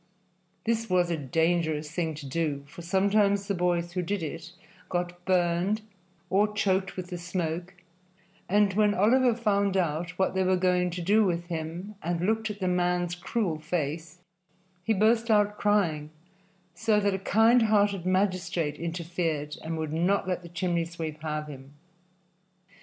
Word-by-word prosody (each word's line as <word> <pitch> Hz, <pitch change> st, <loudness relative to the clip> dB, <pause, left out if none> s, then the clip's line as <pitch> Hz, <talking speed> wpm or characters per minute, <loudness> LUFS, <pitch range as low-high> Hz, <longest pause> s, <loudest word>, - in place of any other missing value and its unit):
This 225 Hz, -1 st, 0 dB
was 180 Hz, -1 st, +2 dB
a -, -, +1 dB
dangerous 160 Hz, +1 st, 0 dB
thing 165 Hz, -2 st, -2 dB
to 145 Hz, -1 st, -8 dB
do, 145 Hz, 0 st, -2 dB
for 165 Hz, +4 st, -11 dB
sometimes 200 Hz, +2 st, +2 dB
the 200 Hz, -, 0 dB
boys 175 Hz, -1 st, 0 dB
who 180 Hz, 0 st, -2 dB
did 185 Hz, +1 st, -2 dB
it 165 Hz, +2 st, -6 dB, 0.4 s
got 175 Hz, 0 st, -3 dB
burned 185 Hz, +3 st, +1 dB, 0.4 s
or 205 Hz, +3 st, +2 dB
choked 190 Hz, -2 st, 0 dB
with 180 Hz, -1 st, -6 dB
the 175 Hz, -, -4 dB
smoke, 175 Hz, +1 st, -3 dB, 0.7 s
and 205 Hz, 0 st, +3 dB
when 210 Hz, 0 st, +3 dB
Oliver 240 Hz, +4 st, +4 dB
found 200 Hz, -4 st, +1 dB
what 175 Hz, +2 st, 0 dB
they 190 Hz, -, +1 dB
were 185 Hz, 0 st, +2 dB
going 180 Hz, 0 st, +2 dB
to 175 Hz, 0 st, -5 dB
do 210 Hz, +5 st, +4 dB
with 175 Hz, -2 st, -1 dB
him 170 Hz, +5 st, -5 dB
and 170 Hz, +1 st, -2 dB
looked 220 Hz, +1 st, 0 dB
at 205 Hz, -1 st, -6 dB
the 185 Hz, -, -1 dB
man's 180 Hz, -1 st, +1 dB
cruel 175 Hz, -2 st, -2 dB
face, 160 Hz, +1 st, -3 dB, 0.7 s
he 225 Hz, -, 0 dB
burst 225 Hz, +3 st, +3 dB
out 210 Hz, -1 st, +3 dB
crying, 170 Hz, -8 st, +1 dB, 0.6 s
so 215 Hz, +3 st, +2 dB
that 200 Hz, -1 st, +1 dB
a 190 Hz, -, -2 dB
kind 225 Hz, +5 st, +4 dB
hearted 205 Hz, -4 st, +2 dB
magistrate 185 Hz, -4 st, 0 dB
interfered 165 Hz, -3 st, -3 dB
and 165 Hz, 0 st, -3 dB
would 155 Hz, -1 st, -3 dB
not 180 Hz, +4 st, +1 dB
let 180 Hz, -1 st, -1 dB
the 170 Hz, -, -11 dB
chimney 175 Hz, -1 st, -1 dB
sweep 160 Hz, -2 st, -6 dB
have 155 Hz, -1 st, -3 dB
him. 140 Hz, -1 st, -11 dB
180 Hz, 160 wpm, -28 LUFS, 165-200 Hz, 0.7 s, Oliver